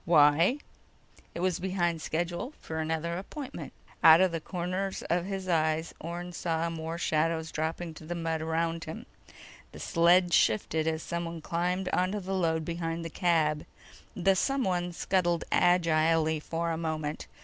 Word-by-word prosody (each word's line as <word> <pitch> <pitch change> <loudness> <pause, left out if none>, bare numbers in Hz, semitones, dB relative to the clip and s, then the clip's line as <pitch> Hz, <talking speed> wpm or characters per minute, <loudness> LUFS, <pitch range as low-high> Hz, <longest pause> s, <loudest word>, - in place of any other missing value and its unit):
"Why?" 165 - +5 0.8
"It 170 - -3
was 185 -1 +1
behind 175 -3 -1
schedule 175 - -3
for 160 0 -5
another 160 +2 -2
appointment." 275 +7 -7 0.3
Out 160 0 +9
of 185 -1 +4
the 165 -1 -3
corners 185 +3 -3
of 175 0 +1
his 195 -1 -4
eyes, 160 -1 +1
Orne 175 +2 -6
saw 165 -1 -1
more 165 0 -4
shadows 160 0 0
dropping 160 +2 -3
to 155 - -12
the 175 - -3
mud 165 -1 -2
around 165 +1 -1
him. 160 - -7 0.7
The - - -10
sled 175 +1 +4
shifted 155 +9 +2
as 160 0 -1
someone 170 -1 -4
climbed 180 +3 -1
onto 185 +4 0
the 190 0 -4
load 160 -4 0
behind 165 0 -3
the 165 - -5
cab. 155 -4 +1 0.5
The 190 +1 +3
someone 185 -8 0
scuttled 175 -1 0
agilely 165 -2 +3
for 165 +2 -2
a 165 - -2
moment. 155 -2 -3
170 Hz, 150 wpm, -29 LUFS, 160-180 Hz, 0.8 s, Out